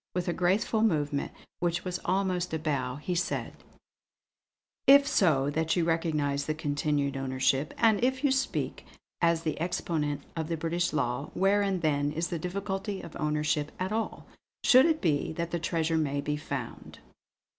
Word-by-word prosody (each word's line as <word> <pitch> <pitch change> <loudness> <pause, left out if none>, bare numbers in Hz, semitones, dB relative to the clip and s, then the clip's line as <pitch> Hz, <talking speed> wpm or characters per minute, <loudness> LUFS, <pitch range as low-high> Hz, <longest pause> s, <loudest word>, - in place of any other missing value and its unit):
With 180 -1 -1
a 175 - +1
graceful 200 +6 +1
movement, 150 -9 +1 0.3
which 175 +1 -1
was 180 0 -2
almost 180 -2 0
a - - +1
bow, 140 -5 -2
he 150 +5 -3
said: 175 +1 -2 1.3
"If 280 +1 +8
so 145 - +3
that 160 +2 0
you 175 - +2
recognise 150 -4 0
the 155 - -1
continued 145 -2 -1
ownership, 135 +2 0
and 225 -1 +3
if 260 +2 +1
you 285 - +3
speak 265 +1 -1 0.4
as 170 -1 +2
the 155 -1 -2
exponent 150 -4 -1
of 160 -2 -2
the 165 0 -2
British 170 +2 -1
law, 140 -1 -1
wherein 195 -1 +2
then 145 -2 +1
is 165 +2 -2
the 170 - -3
difficulty 195 +3 -3
of 165 - -10
ownership 150 0 0
at 185 +2 -2
all; 225 +1 -3 0.4
should 260 +5 +7
it 320 -1 +1
be 155 -4 0
that 170 +1 -3
the 170 - -1
treasure 165 0 0
may 145 -2 0
be 150 +1 -1
found?" 150 - -6
165 Hz, 165 wpm, -29 LUFS, 150-185 Hz, 1.3 s, If